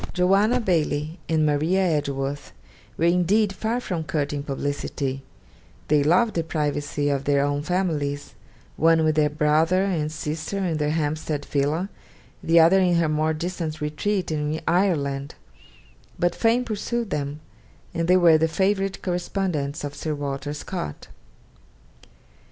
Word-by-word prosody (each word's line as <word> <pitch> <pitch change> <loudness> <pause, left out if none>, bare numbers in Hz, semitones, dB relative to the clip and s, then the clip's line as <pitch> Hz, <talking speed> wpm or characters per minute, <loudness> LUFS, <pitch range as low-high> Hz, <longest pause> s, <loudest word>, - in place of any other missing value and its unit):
Joanna 195 +7 +3
Baillie 160 -5 -1
and 160 -1 +2
Maria 155 +6 +2
Edgeworth 145 -4 -2 0.4
were 165 - +1
indeed 185 +4 +3
far 220 +5 -1
from 180 -9 -3
courting 145 -2 -2
publicity; 140 -1 -3 0.7
they 150 -1 +4
loved 185 +9 +3
the 165 - 0
privacy 145 -2 -2
of 140 -1 -1
their 140 0 +3
own 145 0 -1
families, 150 -5 -2 0.4
one 165 +1 +4
with 155 -1 +2
her 150 -1 +4
brother 155 +5 +2
and 165 -6 -1
sister 155 +4 -4
in 180 -5 -1
their 150 -1 0
Hampstead 150 -1 -2
villa, 150 +6 0 0.5
the 165 +1 +4
other 170 +4 +6
in 180 -2 +3
her 165 -2 +2
more 155 +1 +1
distant 165 -1 -4
retreat 170 +6 -1
in 150 0 -1
Ireland; 145 -7 0 0.8
but 175 0 +1
fame 235 +2 +2
pursued 230 +1 -3
them, 145 0 -3 0.5
and 165 -1 -1
they 180 +1 +5
were 165 -3 +6
the 160 - +3
favourite 195 +3 0
correspondents 175 -5 -2
of 145 -1 -4
Sir 150 +1 -3
Walter 145 0 -4
Scott. 150 - -6
155 Hz, 140 wpm, -24 LUFS, 145-180 Hz, 0.8 s, other